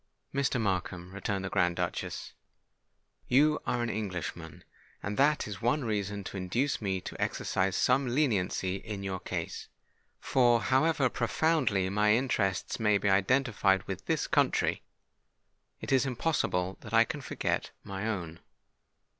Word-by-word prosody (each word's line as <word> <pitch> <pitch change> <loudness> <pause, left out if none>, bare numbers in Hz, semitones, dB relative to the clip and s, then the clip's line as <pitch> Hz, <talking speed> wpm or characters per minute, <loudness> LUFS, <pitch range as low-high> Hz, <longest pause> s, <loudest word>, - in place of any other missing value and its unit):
"Mr. 135 -2 +1
Markham," 90 -3 -2
returned 100 -1 -2
the - - -3
Grand 90 -3 +2
Duchess, - - -3 0.9
"you 150 +4 +4
are 120 -1 0
an 120 - -1
Englishman—and 90 -1 -6
that 150 0 +3
is 100 -2 -7
one 125 +4 +1
reason 100 -2 -2
to 95 - -6
induce 115 +11 -1
me 95 -2 -1
to - - -7
exercise 95 0 0
some 130 +1 +3
leniency 105 -8 0
in 100 -1 -6
your 95 -1 -3
case; - - -5 0.5
for 120 -3 +3
however 135 +4 +2
profoundly 125 - +1
my 105 +1 +4
interests 110 -8 0
may 105 -2 +3
be 100 0 +1
identified 100 -2 +2
with - - -6
this - - +1
country, - - +1 1.0
it - - -5
is 135 0 +3
impossible 115 - -1
that 110 +1 -4
I 115 - +8
can 145 +5 -5
forget - - -2
my 100 +2 -4
own. 85 -7 -4
105 Hz, 140 wpm, -30 LUFS, 95-130 Hz, 1.0 s, I